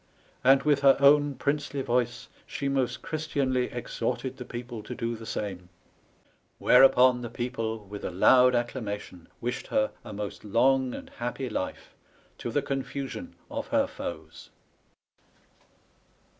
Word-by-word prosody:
And 135 +1 +6
with 145 -2 +3
her 140 -1 +6
own 145 0 +5
Pryncely 140 -1 -1
voyce 120 -1 -1 0.2
she 140 - -3
most 130 -2 -1
Ghristianly 140 -5 -1
exhorted 125 +1 -3
the 125 - -7
people 120 -2 -7
to 105 - -7
do 115 0 -2
the 110 0 -10
same: 95 -4 -4 0.9
whereupon 125 -1 +6
the 120 - -5
people 115 -3 -4
with 100 +1 -8
a - - -2
loud 125 +8 +5
accla 120 +2 -1
mation 100 -5 -6
wished 120 +1 -3
her 270 -1 +1
a - - -9
most 105 -1 -6
long 125 +4 +2
and - - -9
happy 125 +2 -3
life, 95 - -4 0.5
to - - -4
the - - 0
confusion 140 - -4 0.2
of 285 -1 -4
her 280 -1 +2
foes." 280 - -8
125 Hz, 140 wpm, -28 LUFS, 115-140 Hz, 0.9 s, And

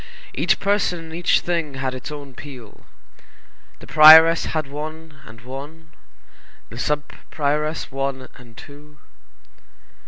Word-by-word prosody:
Each - - 0
person 200 -3 0
and 165 -1 -11
each 175 +1 +1
thing 165 -5 -3
had 130 -1 -3
its 130 +3 -8
own 145 -3 -9
peal. 125 -5 -13 0.9
The - - -11
prioress 160 +2 +7
had 155 -2 -3
one 155 +2 -9
and 110 0 -14
one, 145 +6 -10 0.8
the 115 - -9
sub 150 +2 -1 0.3
prioress 150 +1 -2
one 135 -1 -4
and 120 -2 -17
two. 150 +3 -15
150 Hz, 125 wpm, -21 LUFS, 135-160 Hz, 0.9 s, prioress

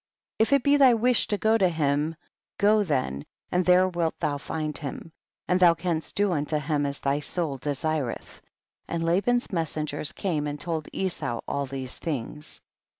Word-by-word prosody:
63. - - +6
If 280 +5 +4
it - - -17
be 285 0 +5
thy 265 -3 +7
wish 240 +1 +2
to 205 - 0
go 220 +2 +3
to 185 -3 +4
him, 150 -1 0 0.4
go 210 +1 +4
then 130 - -1 0.3
and 180 +1 +2
there 180 +1 +5
wilt 170 -3 -2
thou 145 -1 -1
find 155 0 -3
him, 150 +2 -5 0.4
and 180 - +2
thou 175 -2 +6
canst 165 -3 -3
do 205 -1 +2
unto 150 -1 0
him 150 -1 0
as 140 0 -4
thy 140 +1 0
soul 150 -2 -2
desireth; 145 -1 -3 0.5
and 170 -1 -2
Laban's 205 +9 +1
messen 160 -4 -2
gers 145 0 -3
came 155 -6 -2
and' 145 0 -4
told 160 -2 -3
Esau 175 -11 -2
all 140 -1 -2
these 130 -1 -6
things. 150 0 -5
160 Hz, 180 wpm, -26 LUFS, 145-185 Hz, 0.5 s, thy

